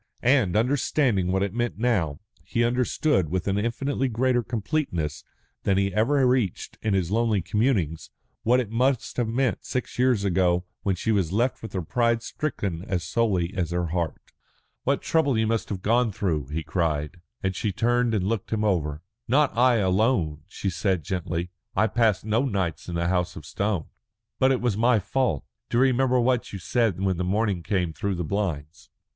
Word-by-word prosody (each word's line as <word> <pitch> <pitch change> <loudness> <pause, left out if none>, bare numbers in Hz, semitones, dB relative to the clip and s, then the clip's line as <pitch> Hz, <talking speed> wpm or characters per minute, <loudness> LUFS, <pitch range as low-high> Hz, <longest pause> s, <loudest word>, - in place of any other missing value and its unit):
And, 120 -8 +3
understanding 120 -5 +2
what 95 +1 +1
it 100 -1 -2
meant 120 -2 -1
now, 100 -11 0 0.2
he 120 - 0
understood, 120 - +1
with 90 +2 -2
an 100 +1 +1
infinitely 130 +5 -1
greater 125 +1 +1
completeness 105 - -2 0.4
than 95 -1 +1
he 100 0 +1
had - - -12
ever 130 +7 +3
reached 125 -7 0
in 105 -3 +1
his 90 -2 0
lonely 110 -1 +2
communings, 95 - 0 0.3
what 125 +3 +3
it 115 -4 -3
must 125 +2 0
have 120 -2 +1
meant 120 +2 0
six 125 -1 -4
years 125 -5 +3
ago 90 -1 +2 0.2
when 95 -2 0
she 110 +5 -1
was 95 -6 +1
left 120 +6 0
with 110 - -8
her 95 -3 -2
pride 115 +5 +1
stricken 100 - -3
as 90 -3 -1
sorely 95 -2 0
as 85 -3 -1
her 85 -1 -1
heart. 85 -1 -2 0.7
"What - - +1
trouble 145 -7 +2
you 110 - +2
must 115 0 -1
have 95 -2 -4
gone 115 +1 +3
through!" 85 - -1
he 80 +3 -3
cried, 75 +1 -2 0.2
and 95 -1 0
she 105 +2 -1
turned 120 +3 +1
and 95 -3 0
looked 110 -1 -2
him 110 -1 0
over. 80 -7 0 0.2
"Not 140 -1 +3
I 125 +1 +5
alone," 95 - +1
she 95 - -3
said 90 -1 0
gently. 90 -2 -3 0.2
"I - - +4
passed 110 -3 +1
no 110 +4 +2
nights 95 - -2
in 85 - -4
the 85 0 0
House 90 -1 0
of 75 - -9
Stone." 100 -2 -1 0.5
"But 130 0 +4
it 130 - +1
was 120 -4 +1
my 115 +2 +4
fault. 110 - 0 0.3
Do 120 - 0
you 125 - +5
remember 130 -1 +3
what 125 0 +1
you 100 - -5
said 105 +1 0
when 95 -2 0
the 90 - -1
morning 100 0 0
came 90 -3 -1
through 100 +2 -2
the 90 - -2
blinds? 85 -2 -3
105 Hz, 190 wpm, -25 LUFS, 90-120 Hz, 0.7 s, I